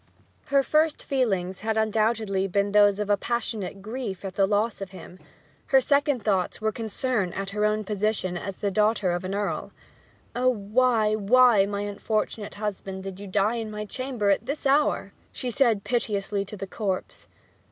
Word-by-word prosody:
Her 275 -1 +3
first 310 +2 +2
feelings 195 -9 0
had 220 +1 -1
undoubtedly 215 -2 +1
been 200 +2 0
those 205 -1 +5
of 210 0 +1
passionate 215 -5 -3
grief 215 -4 -5
at 190 - -4
the 195 0 +2
loss 210 +1 0
of 195 - -5
him; 185 -1 -12 0.5
her 270 - +6
second 280 -2 +1
thoughts 190 -4 0
were 220 0 0
concern 220 -2 -1
at 195 0 -4
her 210 +1 0
own 215 0 +1
position 210 -2 -1
as 185 +2 -5
the 200 - -1
daughter 210 -2 +2
of 175 +1 -2
an 190 +1 -3
earl. 205 0 -2 0.6
'Oh, 250 +1 +3
why, 220 0 +2
why, 215 -1 +5
my 200 0 -3
unfortunate 205 +1 -3
husband, 195 -2 -5
did 190 -1 -7
you 200 - -8
die 205 +4 +1
in 225 -1 -4
my 210 0 -5
chamber 240 -2 -1
at 205 +4 0
this 280 +2 -4
hour!' 285 +2 +2 0.2
she 250 -2 -4
said 230 -5 +2
piteously 205 -4 -1
to 210 +2 -8
the 195 - -4
corpse. 195 -1 -4
210 Hz, 175 wpm, -26 LUFS, 195-235 Hz, 0.6 s, her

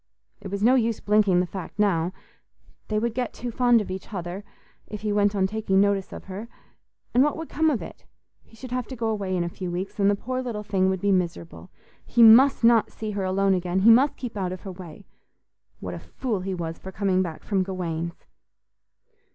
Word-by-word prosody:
It - - -7
was 200 +1 -3
no 245 +3 +6
use 230 -3 +1
blinking 205 -4 +3
the - - 0
fact 185 +2 -8
now—they 195 +2 -3
would 230 +1 0
get 245 0 -3
too 245 0 -5
fond 240 -1 +3
of 195 - -6
each 190 +3 -7
other, 180 0 -5 0.4
if 210 - -7
he 210 -1 -1
went 205 0 +2
on 190 -1 +2
taking 195 -1 0
notice 200 -1 +1
of - - -8
her—and 225 +5 -4
what 295 - 0
would 325 0 -6
come 320 +1 +2
of 270 -7 -1
it? - - -11 0.4
He - - -21
should 250 +2 -10
have 250 -2 -2
to 260 - -7
go 225 -2 -2
away 195 -4 -2
in 175 - 0
a - - -2
few 180 +1 -6
weeks, 185 +4 -5
and 200 0 +4
the 205 - +3
poor 255 +5 -4
little 230 -5 -4
thing 190 -2 +1
would 190 -1 -2
be 205 - +2
miserable. 175 -1 -2 0.3
He 235 - +3
must 245 +4 +7
not 230 -1 +5
see 215 -1 -5
her 200 -1 -3
alone 195 +1 +2
again; 180 0 0
he 225 +4 +7
must 265 +5 +4
keep 245 -3 -6
out 185 -3 -2
of 185 - -7
her 195 - -7
way. 180 +1 -11 0.7
What - - -6
a - - -6
fool 235 -7 -4
he 190 +1 -3
was 165 -2 -5
for 190 - -9
coming 190 -1 +1
back 165 -4 -5
from 195 -2 0
Gawaine's! 170 -3 -4
200 Hz, 215 wpm, -25 LUFS, 185-225 Hz, 0.7 s, must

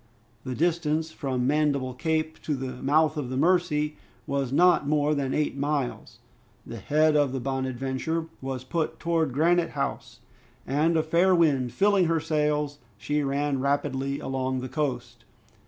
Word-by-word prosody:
The 130 - -4
distance 160 0 0
from 130 -5 -2
Mandible 140 -2 +1
Cape 160 +3 -2
to 150 - -2
the 130 -1 -6
mouth 155 +3 +2
of 140 -4 -3
the 130 - -3
Mercy 155 -2 +1 0.3
was 140 -3 -2
not 175 0 +4
more 150 0 +2
than 140 -2 -1
eight 150 -1 0
miles. 140 -2 -3 0.5
The 115 - -7
head 155 +8 +2
of 145 -3 +3
the 135 - -3
"Bonadventure" 135 +4 -2 0.2
was 130 -1 -4
put 160 +4 -2
towards 165 -3 0
Granite 165 +5 +2
House, 115 -4 -3 0.5
and 155 +4 +1
a 160 - +2
fair 175 +4 +3
wind 140 -7 +2
filling 195 - +3
her 165 -1 +1
sails, 150 -2 -1 0.2
she 150 +8 -1
ran 140 0 -1
rapidly 140 0 -1
along 130 -1 -2
the 130 - -5
coast. 135 -3 -3
145 Hz, 155 wpm, -26 LUFS, 135-160 Hz, 0.5 s, not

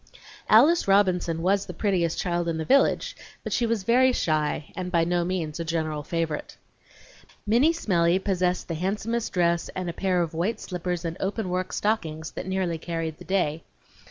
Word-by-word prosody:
Alice 290 +9 +6
Robinson 180 -4 +2
was 195 +2 +1
the 180 - -7
prettiest 175 -4 0
child 175 -1 -1
in 165 -1 -1
the 160 - -3
village, 275 - +2 0.3
but - - -3
she 240 - +1
was 225 -4 -1
very 255 +4 +4
shy 155 - -1
and 180 0 -4
by 170 -2 +3
no 175 +1 +1
means 170 -3 -3
a - - -1
general 160 -2 -2
favorite. 160 0 -3 0.9
Minnie 240 +9 +4
Smellie 180 - +2
possessed 185 -2 -1
the 170 - -3
handsomest 210 +7 -2
dress 170 -2 +1
and 185 -2 -3
a - - -13
pair 180 -1 +1
of 165 - -5
white 190 +7 -1
slippers 180 -1 -4
and 165 +1 -3
open 200 0 -2
work 185 0 -2
stockings 160 -7 -2
that - - -6
nearly 185 -3 -1
carried 165 -2 -4
the - - -11
day. 165 -5 0
180 Hz, 180 wpm, -26 LUFS, 165-200 Hz, 0.9 s, Alice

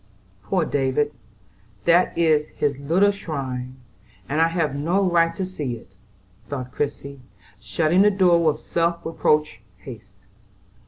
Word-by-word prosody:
"Poor 180 - 0
David, 145 +1 0 0.7
that 170 +1 +3
is 155 -3 +3
his 145 -1 0
little 175 +8 +3
shrine, 130 -9 -5 0.5
and 150 +3 0
I 165 - +5
have 165 -4 -1
no 175 +7 +1
right 165 -1 +2
to 190 - -2
see 150 -9 -4
it," 110 -4 -15 0.6
thought 130 -3 -5
Christie, 140 -1 -4 0.4
shutting 155 - +1
the 205 - +6
door 180 -4 +3
with 155 -2 +2
self 170 0 -1
reproachful 150 -6 0 0.2
haste. 95 - -12
155 Hz, 130 wpm, -23 LUFS, 140-170 Hz, 0.7 s, the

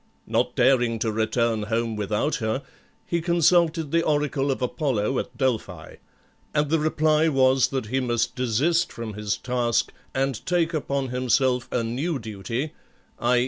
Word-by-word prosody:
Not - - 0
daring 120 -2 +3
to 110 0 -1
return 110 +1 0
home 115 +1 -1
without 105 +9 -1
her, 110 +2 -2 0.4
he 170 -1 -1
consulted 170 -2 +2
the 165 - +3
oracle 145 -3 0
of 135 - 0
Apollo 130 -3 0
at - - -6
Delphi; 110 - -2 0.6
and 150 0 +1
the 165 - +3
reply 155 0 +2
was 130 -2 +4
that 130 -4 -3
he 130 +5 -1
must 120 -3 0
desist 130 +8 +1
from 115 -2 -6
his 105 0 -2
task, 125 -2 0 0.2
and 135 -2 -1
take 170 -1 +1
upon 140 -3 -1
himself 125 0 +1
a 120 - 0
new 135 +8 -2
duty, 115 +5 -4 0.5
_i. 120 +1 +3
130 Hz, 150 wpm, -24 LUFS, 115-150 Hz, 0.6 s, was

